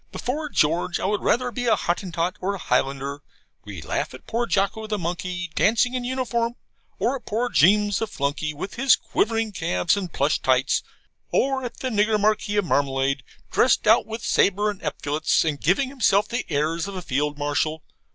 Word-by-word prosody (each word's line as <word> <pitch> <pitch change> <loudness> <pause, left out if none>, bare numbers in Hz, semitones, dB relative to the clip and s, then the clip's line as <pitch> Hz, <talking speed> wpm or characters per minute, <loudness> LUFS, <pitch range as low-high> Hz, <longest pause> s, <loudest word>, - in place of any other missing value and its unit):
Before 295 +5 -3
George, 165 - +1
I - - -2
would 205 +1 0
rather 245 0 +1
be 245 +2 -3
a 225 - +5
Hottentot 175 0 -2
or 200 +2 -1
a - - -5
Highlander. 140 -1 -1 0.4
We - - -8
laugh - - -3
at - - -14
poor 235 +1 -1
Jocko, 210 +2 0
the 215 -1 -1
monkey, 180 0 -4
dancing 235 +6 +2
in 250 -1 -2
uniform; 240 -2 -1 0.4
or 255 - 0
at 260 - -9
poor 235 +4 -1
Jeames, 205 +4 +4
the 225 - -1
flunkey, 150 -3 -2
with 150 +6 -6
his 265 0 +5
quivering 225 0 -1
calves 165 - 0
and 190 -4 -4
plush 145 +2 +1
tights; 130 0 +2 0.5
or 270 0 +1
at 245 - -6
the 260 - -1
nigger 215 -1 +2
Marquis 210 0 +1
of 205 - +2
Marmalade, 135 -2 +1 0.3
dressed 250 - +3
out 220 +2 +5
with 225 +1 -6
sabre 205 +2 +2
and 200 - -11
epaulets, 150 +1 0
and 150 -3 -2
giving 195 - +2
himself 210 -6 +2
the 245 +2 -3
airs 160 +5 0
of 200 - -7
a 185 - -5
field 145 +2 -1
marshal. 150 +2 -1
200 Hz, 185 wpm, -24 LUFS, 155-230 Hz, 0.5 s, a